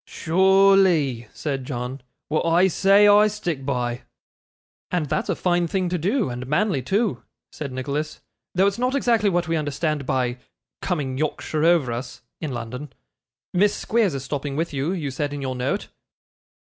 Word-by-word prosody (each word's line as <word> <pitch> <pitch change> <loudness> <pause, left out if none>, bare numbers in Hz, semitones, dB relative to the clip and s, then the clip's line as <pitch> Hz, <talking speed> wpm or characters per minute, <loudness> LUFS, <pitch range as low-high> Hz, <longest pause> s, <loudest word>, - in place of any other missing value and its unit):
'Sure 190 +3 +4
ly,' 150 - +2
said 135 -4 -3
John. 125 +1 -5 0.3
'Wa'at 155 - 0
I 175 +3 +4
say, 200 +3 +5
I 205 +1 +7
stick 175 -9 -3
by.' 125 -3 -2 0.9
'And 175 -4 0
that's 140 - -2
a - - +1
fine 175 -1 +1
thing 185 +1 -1
to 180 0 -1
do, 205 - +1
and 125 +1 -5
manly 150 0 +1
too,' 200 - 0 0.3
said 145 -3 -6
Nicholas, 140 +4 -3 0.4
'though 190 +2 +4
it's 200 +3 0
not 255 +2 +1
exactly 230 -6 +2
what 175 -3 0
we 165 - 0
understand 150 -1 -2
by 125 -2 0 0.4
"coming 140 -7 -2
Yorkshire 155 0 -2
over 165 -7 +3
us" 120 +1 -6 0.2
in 155 -4 -4
London. 125 +4 -6 0.6
Miss 200 +3 +3
Squeers 215 -9 +1
is 135 - -4
stopping 140 0 -4
with 165 +1 -2
you, 140 +4 -1
you 160 -7 -3
said 145 +2 -3
in 145 - -5
your 130 -1 -2
note. 125 +2 -2
155 Hz, 170 wpm, -23 LUFS, 135-190 Hz, 0.9 s, I